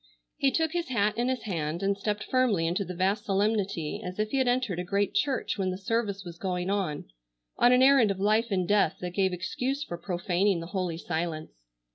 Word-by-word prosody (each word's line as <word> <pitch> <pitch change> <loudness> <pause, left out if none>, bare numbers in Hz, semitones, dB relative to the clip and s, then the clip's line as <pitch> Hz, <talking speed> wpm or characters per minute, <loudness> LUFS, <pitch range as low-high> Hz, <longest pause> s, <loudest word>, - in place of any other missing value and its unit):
He 275 - +3
took 320 +4 0
his 345 0 -2
hat 210 -4 +1
in 240 +1 0
his 260 -1 -1
hand 165 -4 -3
and 200 0 +2
stepped 210 +1 -2
firmly 245 -10 +2
into 175 +5 0
the 180 -1 -7
vast 195 +4 +1
solemnity 200 -5 0
as 180 0 -6
if 215 0 -1
he 275 - 0
had 260 -1 +2
entered 245 -8 0
a - - -1
great 200 +2 0
church 260 0 0
when 190 -1 +1
the 185 - -3
service 200 -1 -2
was 170 -1 -9
going 180 0 -2
on, 180 -8 -2 0.5
on 240 - +5
an 250 +1 +5
errand 265 -5 +6
of 195 -1 -2
life 215 +4 +2
and 185 -4 0
death 205 +1 +3
that 180 0 -3
gave 190 +1 +1
excuse 255 +10 -2
for 175 -12 -7
profaning 185 +1 0
the 165 - -6
holy 180 -4 -1
silence. 165 -2 -3
200 Hz, 215 wpm, -28 LUFS, 180-230 Hz, 0.5 s, errand